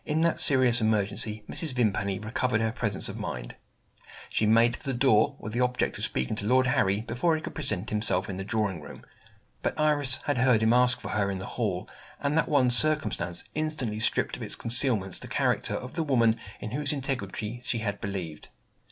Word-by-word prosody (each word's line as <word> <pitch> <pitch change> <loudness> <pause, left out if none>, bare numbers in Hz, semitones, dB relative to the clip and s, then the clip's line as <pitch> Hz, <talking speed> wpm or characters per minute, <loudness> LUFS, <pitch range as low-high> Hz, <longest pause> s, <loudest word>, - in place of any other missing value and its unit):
In 155 +1 -1
that 170 0 +1
serious 130 -3 +4
emergency, 105 0 +1
Mrs. 160 -6 -2
Vimpany 100 -5 0
recovered 110 +2 -1
her 110 0 0
presence 110 -5 +1
of - - -5
mind. - - -6 0.8
She 110 - +1
made 115 +2 +4
for - - -14
the 135 -3 -3
door, 130 +1 +3
with 110 - -8
the 120 - -2
object 125 0 -1
of - - -2
speaking 65 +11 -1
to 100 - -1
Lord 130 +2 +3
Harry 105 -5 +1
before 125 +9 0
he 155 - -4
could - - -6
present 105 0 -3
himself 105 -3 0
in 95 - -5
the 95 - -4
drawing 100 -5 -2
room. - - -12 0.6
But - - -3
Iris 145 -4 +2
had 145 -4 -1
heard 125 -3 +3
him 110 +1 +3
ask 125 0 +3
for - - -7
her 100 -2 0
in 95 - -3
the 95 - -6
hall; 100 -7 -2 0.3
and 145 +1 -1
that 165 - +1
one 135 -5 +3
circumstance 115 - +4
instantly 150 -9 -1
stripped - - 0
of - - -11
its - - -3
concealments 115 -6 +1
the - - -9
character - - 0
of 125 - -7
the 165 - -2
woman 120 -7 +2 0.2
in 105 - -7
whose 145 +2 -1
integrity 120 -5 -4
she 120 - -2
had 100 -3 -4
believed. 90 -6 -6
115 Hz, 205 wpm, -27 LUFS, 105-130 Hz, 0.8 s, serious